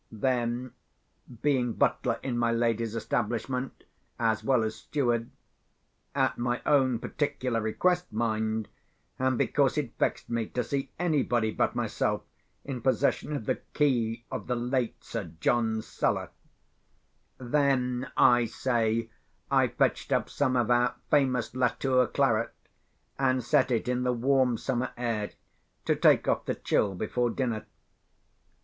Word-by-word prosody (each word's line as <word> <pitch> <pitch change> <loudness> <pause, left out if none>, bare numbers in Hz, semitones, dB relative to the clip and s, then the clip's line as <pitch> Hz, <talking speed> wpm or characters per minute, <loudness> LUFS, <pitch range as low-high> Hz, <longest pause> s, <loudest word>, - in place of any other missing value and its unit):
Then, 120 +2 -1 0.7
being 130 -5 +2
butler - - +1
in 130 -3 -2
my 120 -1 +2
lady's 115 -1 0
establishment, 120 +3 -2 0.3
as 110 -2 +1
well 125 -1 +3
as 110 0 -1
steward 120 -5 -1 0.9
(at 135 -3 +1
my 120 0 0
own 130 -4 +3
particular 130 -3 -2
request, 180 +12 0
mind, 110 -1 -1 0.5
and 130 -1 +1
because 140 0 +2
it 135 -6 -2
vexed - - 0
me 115 -2 -1
to 125 - -2
see 135 +3 -3
anybody 130 -10 +1
but - - 0
myself - - -1 0.4
in 130 -4 -4
possession 135 +4 +1
of 115 - -4
the - - 0 0.2
key 120 -5 +1
of - - -5
the 125 - 0
late 125 0 -2
Sir 80 - -5
John's 110 0 +1
cellar)—then, 130 -1 -3
I 120 -1 +6
say, 115 -1 0 0.4
I - - +4
fetched - - 0
up - - +1
some 130 -3 +1
of 120 -1 +2
our 120 0 +3 0.2
famous 130 -6 +2
Latour 130 0 +2
claret, - - +1 0.6
and 130 -2 +2
set 120 - +3
it 120 -1 0
in 125 0 0
the 125 0 +1
warm 125 0 +2
summer 130 0 -1
air 115 -4 -1 0.6
to - - +2
take - - +4
off - - +1
the - - -1
chill 100 -2 0
before 120 +5 0
dinner. 115 -3 -2
120 Hz, 135 wpm, -28 LUFS, 115-130 Hz, 0.9 s, I